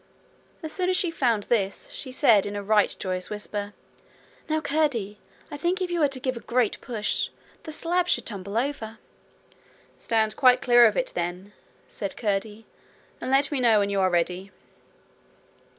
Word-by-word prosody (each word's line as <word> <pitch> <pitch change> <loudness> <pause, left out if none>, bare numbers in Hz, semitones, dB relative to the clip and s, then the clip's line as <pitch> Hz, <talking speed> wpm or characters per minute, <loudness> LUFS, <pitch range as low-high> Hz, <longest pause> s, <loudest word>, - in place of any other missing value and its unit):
As 315 - -4
soon 365 -1 0
as 370 - +2
she 350 - +1
found 235 -9 +1
this, 200 -3 -1
she 260 - -6
said 230 -7 +4
in 205 - -5
a 205 - -4
right 210 0 +3
joyous 185 -1 -3
whisper: 210 -1 -5 0.8
'Now, 315 0 +1
Curdie, 280 -9 -1 0.3
I 290 - -5
think 350 +5 0
if 365 -1 -2
you 345 - -1
were 300 - +4
to 270 -1 -5
give 255 0 -2
a - - -6
great 235 -2 0
push, 220 -4 -2 0.4
the 315 - -6
slab 350 +3 0
would - - -6
tumble 200 -1 -4
over.' 230 -4 -3 1.0
'Stand 220 -1 +1
quite 250 -1 +5
clear 240 -2 +6
of - - -1
it, - - -1
then,' 180 +4 -4 0.3
said 200 -2 -6
Curdie, 210 0 -2 0.6
'and - - -3
let 275 +2 +3
me 285 - 0
know 235 -3 +5
when 200 -1 +1
you 200 - 0
are 185 - +3
ready.' 180 +2 -1
230 Hz, 175 wpm, -25 LUFS, 205-285 Hz, 1.0 s, clear